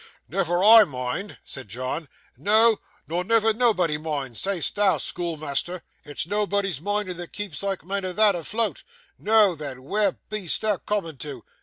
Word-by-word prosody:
'Never 175 Hz, 0 st, 0 dB
I 220 Hz, +1 st, +10 dB
mind!' 130 Hz, +5 st, -4 dB
said 130 Hz, -4 st, -7 dB
John, 130 Hz, -, -4 dB, 0.3 s
'no, 215 Hz, -, +4 dB, 0.3 s
nor 175 Hz, +3 st, -1 dB
never 225 Hz, +2 st, +3 dB
nobody 185 Hz, -10 st, +2 dB
mind, 145 Hz, -6 st, -4 dB
say'st 190 Hz, -, -1 dB
thou, 200 Hz, -2 st, +3 dB
schoolmeasther. 170 Hz, 0 st, -3 dB, 0.2 s
It's 145 Hz, 0 st, -4 dB
nobody's 200 Hz, -4 st, -1 dB
minding 205 Hz, -1 st, -2 dB
that 175 Hz, -1 st, -8 dB
keeps 200 Hz, -8 st, -5 dB
sike 195 Hz, -1 st, -3 dB
men 195 Hz, +1 st, -2 dB
as 180 Hz, -1 st, -4 dB
thou 215 Hz, -1 st, +6 dB
afloat. 205 Hz, +5 st, -2 dB, 0.4 s
Noo 210 Hz, -4 st, +4 dB
then, 140 Hz, -4 st, -7 dB
where 200 Hz, +6 st, +1 dB
be'est 210 Hz, -6 st, -2 dB
thou 215 Hz, -3 st, +1 dB
coomin' 175 Hz, -9 st, -3 dB
to? 135 Hz, -3 st, -7 dB
185 Hz, 155 wpm, -25 LUFS, 150-205 Hz, 0.4 s, I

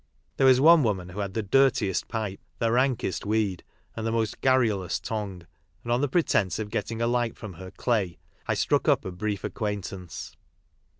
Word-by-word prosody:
There 135 Hz, -, +5 dB
was 130 Hz, -1 st, +6 dB
one 165 Hz, +3 st, +7 dB
woman 95 Hz, -7 st, -1 dB
who 95 Hz, +3 st, -7 dB
had 100 Hz, -2 st, -3 dB
the 110 Hz, -, 0 dB
dirtiest 105 Hz, -3 st, +2 dB
pipe, 110 Hz, -4 st, -3 dB, 0.2 s
the 115 Hz, -1 st, +1 dB
rankest 125 Hz, -5 st, +1 dB
weed, 105 Hz, -4 st, 0 dB, 0.3 s
and 110 Hz, -, -4 dB
the 115 Hz, -, 0 dB
most 115 Hz, -1 st, -1 dB
garrulous 110 Hz, -9 st, +2 dB
tongue, 100 Hz, -5 st, -5 dB, 0.4 s
and 120 Hz, -, -3 dB
on 120 Hz, +2 st, +2 dB
the 145 Hz, -, +2 dB
pretence 110 Hz, -, +1 dB
of 105 Hz, -1 st, -5 dB
getting 115 Hz, 0 st, -2 dB
a -, -, +2 dB
light 120 Hz, -1 st, 0 dB
from 110 Hz, -5 st, -8 dB
her 95 Hz, +2 st, -9 dB
" -, -, -34 dB
clay," 105 Hz, -8 st, 0 dB, 0.3 s
T -, -, +2 dB
struck -, -, +1 dB
up -, -, +3 dB
a 95 Hz, -, -4 dB
brief 100 Hz, +2 st, -3 dB
acquaintance. 100 Hz, -4 st, -5 dB
110 Hz, 190 wpm, -27 LUFS, 95-120 Hz, 0.4 s, one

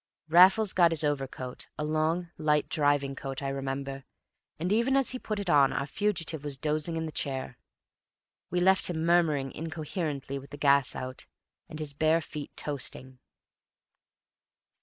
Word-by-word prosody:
Raffles 185 Hz, +5 st, +6 dB
got 175 Hz, -2 st, +5 dB
his 165 Hz, -2 st, +1 dB
overcoat, 135 Hz, -3 st, -3 dB
a 150 Hz, -, -2 dB
long, 160 Hz, +3 st, 0 dB
light 150 Hz, -1 st, +1 dB
driving 145 Hz, -2 st, +1 dB
coat, 135 Hz, +1 st, -6 dB
I 135 Hz, -, -1 dB
remember, 135 Hz, 0 st, -4 dB, 0.5 s
and 175 Hz, +4 st, -2 dB
even 235 Hz, +5 st, +3 dB
as 270 Hz, -, +1 dB
he 255 Hz, -, -5 dB
put 215 Hz, -3 st, -4 dB
it 200 Hz, -, -5 dB
on 145 Hz, -5 st, +5 dB
our -, -, -2 dB
fugitive 165 Hz, -2 st, -1 dB
was 145 Hz, -2 st, -3 dB
dozing 155 Hz, +3 st, -1 dB
in 160 Hz, -, -2 dB
the 160 Hz, -, -5 dB
chair; 130 Hz, -4 st, -3 dB, 0.9 s
we 180 Hz, -, 0 dB
left 190 Hz, +1 st, +4 dB
him 160 Hz, -2 st, -2 dB
murmuring 155 Hz, -6 st, +2 dB
incoherently, 155 Hz, -3 st, -4 dB
with 135 Hz, -, -13 dB
the 145 Hz, -, -9 dB
gas 140 Hz, -2 st, +3 dB
out, 130 Hz, 0 st, -6 dB, 0.4 s
and 155 Hz, -, -7 dB
his 150 Hz, -2 st, -5 dB
bare 155 Hz, +3 st, +3 dB
feet 150 Hz, -2 st, -8 dB
toasting. 130 Hz, -2 st, -2 dB
150 Hz, 160 wpm, -29 LUFS, 140-170 Hz, 0.9 s, Raffles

